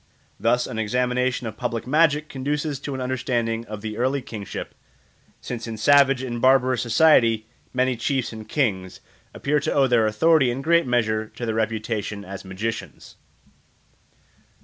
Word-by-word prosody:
Thus 120 +2 +2
an 110 - -5
examination 125 +3 0
of 110 -1 -6
public 115 -1 -3
magic 150 +2 +2
conduces 145 +1 -3
to 140 -1 -5
an 130 - -4
understanding 120 -3 -2
of 105 -1 -7
the 110 0 -5
early 130 +2 0
kingship, 105 -5 -7 0.7
since 120 -1 -6
in 115 -1 -5
savage 135 +2 +4
and 120 -2 -4
barbarous 130 -1 +4
society 115 -3 +4 0.3
many 130 0 +1
chiefs 130 +1 -1
and 110 -1 -10
kings 95 -10 -1 0.3
appear 150 +1 0
to 145 - -2
owe 140 - +3
their 120 -4 +3
authority 140 +5 +3
in 130 +3 -3
great 170 -1 +3
measure 110 -3 0
to 120 - -7
their 110 - -1
reputation 110 -2 -2
as 100 0 -8
magicians. 100 +4 -6
120 Hz, 150 wpm, -23 LUFS, 110-135 Hz, 0.7 s, savage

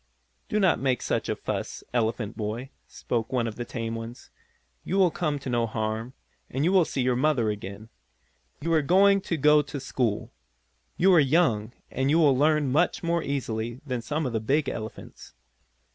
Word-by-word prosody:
"Do 210 - +1
not 190 -5 +3
make 130 -3 0
such - - -1
a - - 0
fuss, - - -5
elephant 115 -2 -1
boy," 115 +5 -4 0.2
spoke 115 -2 -3
one 125 -3 +1
of 110 -2 -4
the 120 - -5
tame 115 -1 -4
ones. 115 +2 -8 0.5
"You 190 - -2
will 185 -3 +4
come 150 -4 -1
to 135 - -9
no 120 -2 +1
harm, 110 +2 -3 0.4
and 135 +3 -1
you 180 - +3
will 185 -3 +5
see 135 - -2
your 125 0 +2
mother 125 -5 +2
again. 100 +1 -7 0.7
You 165 +2 0
are 160 - +4
going 195 +6 +4
to 170 - -2
go 150 +1 +5
to 145 0 -6
school. 125 -5 -2 0.7
You 190 +2 +5
are 175 - +7
young, 130 -7 +2 0.2
and 135 +1 0
you 155 - +4
will 150 -5 +5
learn 150 0 +2
much 165 +6 +1
more 170 0 +1
easily 120 -5 -3
than 125 -4 -3
some 150 +6 -2
of 125 - -2
the 110 - +1
big 140 +7 +1
elephants. 110 -1 -7
130 Hz, 190 wpm, -26 LUFS, 115-155 Hz, 0.7 s, are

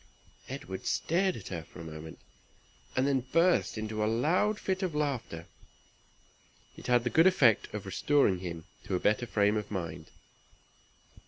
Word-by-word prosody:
Edward 135 -8 -6
stared 185 +3 +1
at 95 - -8
her 85 -3 -4
for 80 - -14
a - - -7
moment, 80 0 -9 0.8
and 130 - +2
then 135 -3 +1
burst 170 -7 +3
into 110 0 -2
a - - +1
loud 175 - +1
fit 190 0 -2
of 180 -5 -2
laughter. 130 - -2 1.3
It - - -10
had 120 -1 +4
the 120 - -1
good 165 +3 +6
effect 135 - +4
of 105 -2 -6
restoring 100 0 +2
him 85 -3 -6 0.2
to - - -1
a - - 0
better 105 +5 +1
frame 105 0 +2
of 105 - -4
mind. 85 -5 -5
110 Hz, 160 wpm, -30 LUFS, 95-150 Hz, 1.3 s, good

